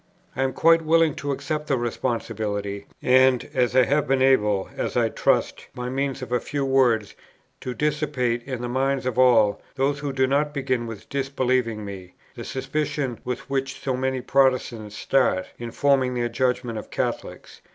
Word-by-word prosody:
I 130 - -2
am 135 -1 0
quite 165 0 +5
willing 165 -1 +3
to 145 0 -3
accept 150 +2 -3
the 135 - +1
responsibility; 110 -4 -3 0.2
and, 130 0 +4
as 125 -2 +1
I 130 - +7
have 145 +3 +1
been 135 -1 +2
able, 105 -7 +3
as - - -2
I - - +3
trust, - - 0
by 125 0 -4
means 135 0 -2
of 125 - -8
a 125 - +2
few 140 +3 -3
words, 125 -6 +2 0.5
to 125 -1 -5
dissipate, 145 -6 0
in 130 -3 -5
the - - -2
minds 135 +1 0
of 130 -1 -1
all 115 -5 +4
those 140 +2 0
who 145 -1 -3
do 130 -1 +2
not 145 +3 0
begin 130 -4 -1
with 115 -3 -9
disbelieving 130 -5 -1
me, 95 -2 -9 0.2
the - - -8
suspicion 135 -2 -3
with 125 0 -5
which 135 0 -2
so 130 -2 -2
many 130 0 -1
Protestants 125 -5 +1
start, 125 -9 +1
in 120 -1 -5
forming 130 0 +2
their 120 -1 -1
judgment 125 -1 -1
of - - -11
Catholics, - - -4
viz. - - -31
130 Hz, 180 wpm, -24 LUFS, 120-135 Hz, 0.5 s, I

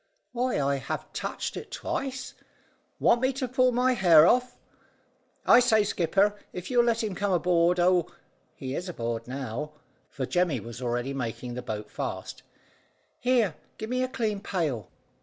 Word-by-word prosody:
"Why, 250 +1 0
I 140 0 +1
have 130 - -5
touched - - -4
it - - -7
twice. 260 -2 -4 0.7
Want 235 - +4
me 260 +1 +3
to 260 0 -2
pull 255 +1 +3
my 250 +1 +2
hair 170 -8 +7
off? 250 +5 +2 0.9
I 240 - +8
say, 225 -4 +4
skipper, 195 +2 +2 0.2
if 180 +6 -7
you'll 240 -1 +4
let 230 -1 +1
him 210 -3 -2
come 200 +2 -1
aboard 175 0 +3
oh! 175 -1 +3 0.5
He 130 0 -5
is 180 +5 -4
aboard 115 -6 -4
now," 135 +3 -5 0.4
for 135 - -4
Jemmy 175 -4 +1
was 115 +3 -9
already 120 +2 -1
making 125 -1 -4
the 125 - -4
boat 110 -4 -6
fast - - -5 0.8
"Here, 240 -7 +2 0.2
give 220 +2 -6
me 255 0 +1
a 255 - +1
clean 220 -5 -2
pail." 150 - -2
180 Hz, 160 wpm, -27 LUFS, -, 0.9 s, I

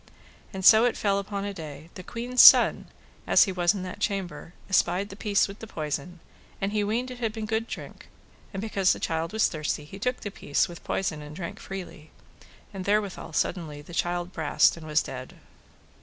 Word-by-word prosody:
And 190 -1 -5
so 220 +2 +8
it 245 - 0
fell 200 -1 +1
upon 200 0 -4
a 200 - -4
day, 155 -2 -9
the - - -8
queen's 240 +6 +1
son, - - +8 0.4
as - - +6
he 195 - -1
was 175 +1 +2
in 190 - -4
that 185 +2 -7
chamber, 185 -6 -3
espied 190 +1 +1
the 195 - -9
piece 205 -1 +1
with 195 +1 -10
poison, 165 -4 -5 0.4
and 195 +1 -1
he 210 -1 0
weened 235 +5 -1
it 250 - -9
had 225 -3 -1
been 220 0 -5
good 220 +1 -1
drink, - - -9 0.4
and 195 - -5
because 200 -4 +2
the - - -7
child 165 0 -2
was 220 0 +3
thirsty 150 -2 -3
he 195 +6 -11
took 250 +4 -2
the 205 - -5
piece 145 -3 0
with 175 -2 -11
poison 160 -6 -2
and 150 0 -10
drank 170 0 -6
freely; 180 -5 -8 0.6
and 190 -2 -6
therewithal 205 -5 -1
suddenly 150 -2 -2
the 170 - -13
child 175 +1 -2
brast 160 -3 +3
and 160 -2 -10
was 155 0 +2
dead. 130 -1 -8
190 Hz, 200 wpm, -26 LUFS, 165-210 Hz, 0.6 s, so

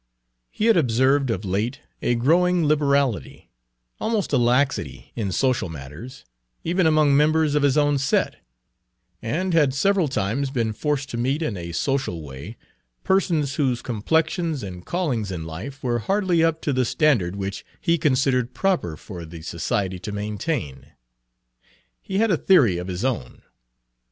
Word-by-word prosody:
He 215 - -2
had 230 -4 +5
observed 130 0 +2
of 105 -2 -2
late 105 +9 -2 0.2
a 120 - +1
growing 170 +7 +3
liberality, 140 - 0 0.5
almost 220 -7 -1
a - - +5
laxity, 125 +3 0
in 105 -5 -2
social 125 -3 +1
matters, 80 - -9 0.4
even 175 +1 +2
among 155 -3 +4
members 155 +1 +3
of 150 - +2
his 140 0 +3
own 145 -1 +3
set, 135 - +1 0.8
and 170 +11 -1
had 145 -5 +3
several 190 +3 +2
times 130 +2 -1
been 115 -5 -1
forced 145 +3 -2
to 120 - -4
meet 135 +7 0
in 135 -10 -2
a 85 -2 -6
social 130 - -1
way 70 - -9 0.5
persons 165 -8 +1
whose 130 -5 0
complexions 160 - 0
and 90 -2 -8
callings 135 - -1
in 85 -4 -5
life 105 +13 -8
were 120 -2 0
hardly 185 - +1
up 165 -1 +1
to 145 - 0
the 130 0 +2
standard 115 - +2
which 100 0 -4 0.2
he 170 0 +1
considered 130 -4 +1
proper 150 - 0
for 90 -1 -9
the 80 0 -10
society 90 +2 -2
to 105 - -6
maintain. 105 - -4 1.1
He 190 - -4
had 220 0 +3
a 175 - +3
theory 125 - +4
of 90 - -6
his 95 +5 -3
own. 115 - -3
130 Hz, 155 wpm, -23 LUFS, 100-155 Hz, 1.1 s, had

